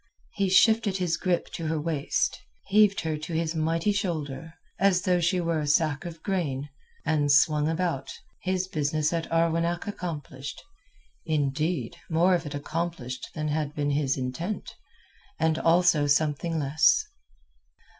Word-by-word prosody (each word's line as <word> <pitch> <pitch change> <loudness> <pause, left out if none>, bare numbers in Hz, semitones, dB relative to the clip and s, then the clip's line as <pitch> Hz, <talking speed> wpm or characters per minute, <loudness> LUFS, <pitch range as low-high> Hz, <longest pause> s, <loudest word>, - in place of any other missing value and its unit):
He 195 -1 0
shifted 215 0 +4
his 175 -3 0
grip 180 -2 -1
to 165 - -4
her 160 0 0
waist, 150 -2 -1 0.3
heaved 205 0 +4
her 155 -2 -2
to 155 +2 -6
his 160 0 0
mighty 165 +4 +1
shoulder, 165 -6 -3 0.2
as 190 -2 +3
though 180 -1 +2
she 175 +2 +1
were 165 -2 0
a 150 - -2
sack 150 0 +1
of 165 -2 -8
grain, 150 -8 -2 0.4
and 145 -2 +2
swung 150 +1 +4
about, 165 -5 -2 0.3
his 185 0 -1
business 155 -1 0
at 165 -1 -3
Arwenack 165 +1 +1
accomplished—indeed, 155 - -4
more 175 +3 +3
of 170 -3 0
it 145 - -5
accomplished 145 -4 -4
than 155 -1 -2
had 150 -1 -2
been 145 -1 0
his 140 -2 +1
intent, 135 +11 -4 0.7
and 160 0 +2
also 165 -3 +4
something 155 +3 +1
less. 150 +2 +3
160 Hz, 140 wpm, -27 LUFS, 150-175 Hz, 0.7 s, shifted